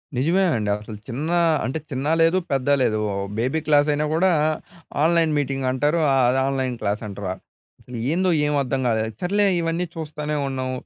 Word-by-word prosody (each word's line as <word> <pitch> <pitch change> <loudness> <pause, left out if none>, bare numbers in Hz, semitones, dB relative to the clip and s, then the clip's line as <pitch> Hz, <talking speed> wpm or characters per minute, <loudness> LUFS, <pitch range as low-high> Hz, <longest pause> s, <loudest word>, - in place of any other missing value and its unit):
నిజమే 170 +9 +2
అండి. 105 -2 -1
అసలు 105 0 -9
చిన్న 145 +7 -4 0.4
అంటే 135 +5 -2
చిన్న 135 +1 -3 0.2
లేదు 165 +3 +4
పెద్ద 135 -1 0
లేదు. 110 -3 +1
ఓహ్! 100 0 -2
బేబీ 130 +7 0
క్లాసైనా 150 0 +3
కూడా 180 +3 +3 0.7
ఆన్‍లైన్ 165 -1 +3
మీటింగ్ 135 -2 -1
అంటారు. 145 +6 +1 0.3
అది 130 +2 +2
ఆన్‍లైన్ 130 -2 -1
క్లాస్ 105 +1 -1
అంటారా? 100 -2 -4 0.5
అసలు 125 -1 -9
ఏందో 185 +3 +1 0.2
ఏమి 150 0 0
అర్థం 135 0 -2
కాలేదు. 110 -1 0
సర్లే 205 +3 +2 0.2
ఇవన్నీ 165 +2 -1
చూస్తానే 150 -1 -4
ఉన్నాం. 130 -1 -3
140 Hz, 160 wpm, -23 LUFS, 125-160 Hz, 0.7 s, లేదు